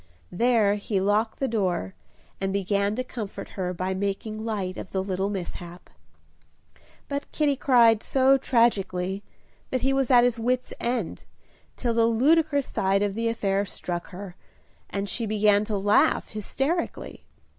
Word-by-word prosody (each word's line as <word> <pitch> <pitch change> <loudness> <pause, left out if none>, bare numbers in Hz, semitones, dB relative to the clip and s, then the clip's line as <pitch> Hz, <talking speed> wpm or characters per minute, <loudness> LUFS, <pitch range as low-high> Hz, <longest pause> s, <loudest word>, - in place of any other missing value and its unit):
There 225 0 +3
he 205 -1 -1
locked 210 +3 +1
the 270 - -1
door, 185 - -1 0.5
and 195 0 -1
began 200 +1 0
to 255 - -2
comfort 225 -5 -7
her 180 -2 -3
by 185 +1 -2
making 200 +3 -3
light 200 -5 -3
of - - -7
the 190 -1 -2
little 190 0 -1
mishap. 175 -2 -7 1.2
But 280 0 -4
Kitty 295 -2 +1
cried 235 -5 +4
so 265 0 +4
tragically, 195 -7 +1 0.5
that 255 - -1
he 270 +1 +2
was 270 -2 +1
at 245 -2 +7
his 245 -1 +1
wit's 250 +2 -1
end, 235 -6 -2 0.5
till 240 -2 -1
the 230 0 +3
ludicrous 285 +4 +3
side 195 +1 +1
of 205 -1 -1
the 230 +2 -1
affair 200 -3 0
struck 175 -3 -5
her, 185 -1 -9 0.5
and 200 0 -3
she 230 +2 -3
began 210 -1 +3
to 210 -1 -2
laugh 205 +2 +3
hysterically. 270 - -3
210 Hz, 150 wpm, -26 LUFS, 195-245 Hz, 1.2 s, at